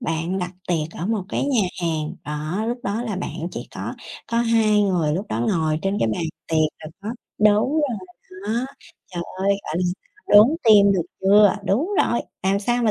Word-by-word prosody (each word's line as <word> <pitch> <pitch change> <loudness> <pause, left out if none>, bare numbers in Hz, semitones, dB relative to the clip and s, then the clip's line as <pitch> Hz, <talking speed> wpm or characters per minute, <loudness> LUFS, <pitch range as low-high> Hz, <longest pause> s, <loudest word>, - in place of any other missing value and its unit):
Bạn 165 +4 -2
đặt 180 -1 -3 0.2
tiệc 165 -2 0
ở 175 - -2
một 220 -3 0
cái - - -1
nhà 265 -6 +2 0.2
hàng, 155 -2 -1
đó, 155 +8 -3
lúc 245 +1 -2
đó 220 0 -2
là 215 -6 -3
bạn 170 -2 -4
chỉ - - -7
có - - -5 0.3
có 235 - 0
hai 225 -3 +3
người. 170 -6 +1
Lúc 195 +4 -3
đó, 110 - -2
ngồi 160 -4 +1
trên 195 +1 0
cái 115 - +2
bàn - - -2 0.3
tiệc, 160 - +1 0.2
rồi 155 - -8
có 210 - -5 0.3
đúng 210 +5 +4
rồi 290 -8 0 0.5
đó. 235 +4 0 0.4
Trời 175 -2 -5 0.2
ơi, 195 +1 0 0.2
gọi 155 - -4
là, 180 - 0 0.4
đốn 210 +2 +9 0.2
tim, 205 -3 +7
được 180 -3 +1 0.2
chưa? 200 +1 +5
Đúng 265 - +1 0.2
rồi, 235 - 0 0.2
làm 195 +1 +2
sao 240 +3 0
mà 220 - +3
200 Hz, 200 wpm, -22 LUFS, 170-220 Hz, 0.5 s, đốn